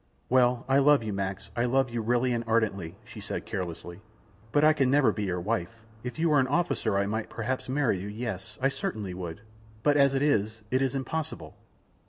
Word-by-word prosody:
"Well, 125 -1 +3
I 135 +1 +4
love 145 -2 +5
you, 110 -2 -3
Max, 95 -1 -4
I 120 - +1
love 130 0 +2
you 120 -1 -2
really 120 +2 +1
and 120 0 -1
ardently," 105 -7 0
she - - -10
said, - - -5
carelessly; 85 0 -5 0.5
"but 145 - +3
I 155 0 +7
can 135 -4 +2
never 140 0 +4
be 105 - -3
your 90 -2 -1
wife. 110 +3 -3 0.2
If 125 +3 -5
you 165 +1 +2
were 150 -2 +5
an 130 - +2
officer 140 - +1
I 100 - +2
might 110 +2 -3
perhaps 130 +3 -3
marry 130 -8 +1
you; 95 - -5
yes, 105 -4 -5
I 135 - +3
certainly 110 -8 -4
would, 90 +1 -6 0.4
but 145 0 +4
as 140 -1 +4
it 135 - +1
is, 110 -6 +1
it 130 +1 +2
is 135 0 0
impossible." 140 +4 -4
120 Hz, 210 wpm, -28 LUFS, 100-135 Hz, 0.5 s, I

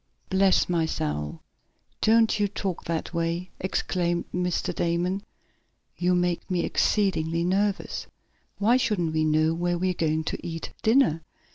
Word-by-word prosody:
"Bless 190 0 +4
my 170 -2 +1
soul! 75 - -3 0.6
Don't 225 0 +4
you 205 - +3
talk 195 -2 -4
that 165 +1 -3
way!" 170 +2 -2
exclaimed 175 -2 -1
Mr. 180 -1 -1
Damon. 175 +3 0 0.7
"You 180 0 +2
make 175 -1 0
me 180 -2 +1
exceedingly 170 -5 +1
nervous. 195 +3 0 0.5
Why 225 +5 +4
shouldn't 180 -10 0
we 155 0 +2
know 155 +1 +3
where 175 +1 0
we 185 +1 +1
are - - -2
going 160 -2 0
to - - -4
eat 165 -1 -5
dinner?" 225 - +3
175 Hz, 140 wpm, -26 LUFS, 165-195 Hz, 0.7 s, Bless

